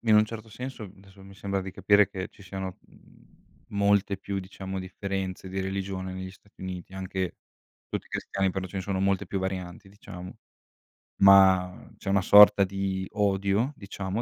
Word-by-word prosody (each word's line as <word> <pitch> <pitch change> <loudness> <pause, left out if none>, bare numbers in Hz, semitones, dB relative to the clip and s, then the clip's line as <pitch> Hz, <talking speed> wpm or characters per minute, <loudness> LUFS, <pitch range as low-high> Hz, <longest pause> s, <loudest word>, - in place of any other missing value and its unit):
in 110 -2 +3
un 105 - +6
certo 110 0 -8
senso, 125 +1 -7
adesso, 95 0 -13
mi 100 0 -13
sembra 100 -1 -2
di 95 - -6
capire 100 +1 +4
che 95 +1 -5
ci 100 - -18
siano, 95 0 -6
mhmm, - - -21 0.4
molte 100 -1 +2
più, 100 0 -4
diciamo, 95 0 -6
differenze 95 0 -4
di 95 +1 -3
religione 95 -1 -4
negli 95 0 -6
Stati 100 +1 -21
Uniti, 95 -1 -6
anche 95 -1 -4 0.5
tutti - - -4
i - - -22
cristiani, 95 -1 -1
però 95 0 -4
ce 95 - -9
ne 95 - -2
sono 95 -1 -2
molte 95 -1 +1
più 95 - -2
varianti, 95 0 -5
diciamo. 95 -3 -10 0.9
Ma 95 -2 +6
c'è - - -6
una 100 0 +3
sorta 100 +1 +8
di 95 0 -3
odio, 100 +4 +1
diciamo, 100 +1 -4
95 Hz, 175 wpm, -27 LUFS, 95-100 Hz, 0.9 s, sorta